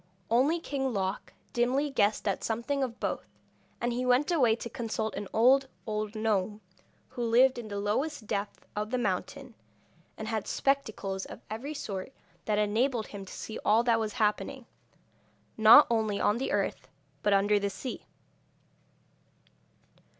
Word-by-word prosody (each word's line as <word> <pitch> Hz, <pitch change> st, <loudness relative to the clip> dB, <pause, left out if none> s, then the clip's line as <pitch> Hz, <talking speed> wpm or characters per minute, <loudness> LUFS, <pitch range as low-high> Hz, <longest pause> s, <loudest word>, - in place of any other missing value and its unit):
Only 275 Hz, +8 st, +3 dB
King 270 Hz, -4 st, -2 dB
Loc 190 Hz, 0 st, -2 dB, 0.2 s
dimly 260 Hz, +5 st, +1 dB
guessed 215 Hz, -4 st, +1 dB
at 195 Hz, -, -1 dB
something 235 Hz, +5 st, -1 dB
of 245 Hz, -3 st, -3 dB
both, -, -, -3 dB, 0.5 s
and 240 Hz, 0 st, -1 dB
he 250 Hz, +1 st, -1 dB
went 255 Hz, +6 st, +3 dB
away 250 Hz, -10 st, +4 dB
to 235 Hz, -, -6 dB
consult 220 Hz, -2 st, -3 dB
an 200 Hz, 0 st, -5 dB
old, 265 Hz, +4 st, +4 dB, 0.2 s
old 215 Hz, 0 st, -3 dB
gnome, 215 Hz, -1 st, 0 dB, 0.5 s
who 255 Hz, -, -6 dB
lived 245 Hz, +3 st, +4 dB
in 230 Hz, -, -7 dB
the 205 Hz, -1 st, -5 dB
lowest 220 Hz, +6 st, -1 dB
depth 205 Hz, -1 st, -4 dB
of 210 Hz, +1 st, -2 dB
the 255 Hz, -, 0 dB
mountain, 245 Hz, +5 st, -3 dB, 0.6 s
and 220 Hz, -, -5 dB
had 220 Hz, -2 st, -2 dB
spectacles 220 Hz, -8 st, -1 dB
of -, -, -11 dB
every 270 Hz, +8 st, -5 dB
sort, 195 Hz, -3 st, -5 dB, 0.3 s
that 210 Hz, -1 st, +1 dB
enabled 220 Hz, +3 st, +1 dB
him 200 Hz, -2 st, -8 dB
to -, -, -10 dB
see 220 Hz, -, -6 dB
all 220 Hz, +3 st, +4 dB
that 230 Hz, -2 st, +3 dB
was 215 Hz, -2 st, -2 dB
happening, 210 Hz, -2 st, -1 dB, 0.9 s
not 220 Hz, +7 st, +9 dB
only 220 Hz, -3 st, +1 dB
on 210 Hz, +3 st, +2 dB
the 265 Hz, -, -2 dB
earth, -, -, -1 dB, 0.3 s
but 205 Hz, -, +2 dB
under 205 Hz, +1 st, +4 dB
the 200 Hz, 0 st, -1 dB
sea. 250 Hz, +6 st, -7 dB
225 Hz, 155 wpm, -29 LUFS, 210-255 Hz, 0.9 s, not